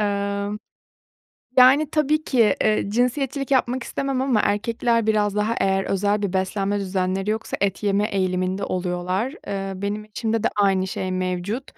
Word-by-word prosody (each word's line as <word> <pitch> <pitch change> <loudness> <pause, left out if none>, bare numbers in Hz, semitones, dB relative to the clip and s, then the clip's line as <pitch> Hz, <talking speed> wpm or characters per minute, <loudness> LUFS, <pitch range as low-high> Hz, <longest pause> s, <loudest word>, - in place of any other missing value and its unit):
Eee, 200 -1 -1 1.1
yani, 270 +4 +6
tabii 305 0 +1
ki, 230 -9 +3
eee, 215 -2 +2
cinsiyetçilik 265 +4 -1
yapmak 255 -1 +1
istemem 275 0 -2
ama 260 -5 +2
erkekler 230 +2 0
biraz 210 -2 +2
daha 210 +2 0
eğer 195 0 +1
özel 205 +2 0
bir 200 -3 -2
beslenme 195 +2 0
düzenleri 190 0 -1
yoksa 220 +1 -2
et 200 +1 0
yeme 205 0 +2
eğiliminde 185 0 -1
oluyorlar. 185 - -2
Eee, 195 -1 -3
benim 210 +1 -3
eşimde 220 +1 -2
de - - +4
aynı 195 -2 +2
şey 185 0 -3
mevcut. 185 +6 -2
205 Hz, 150 wpm, -23 LUFS, 195-235 Hz, 1.1 s, yani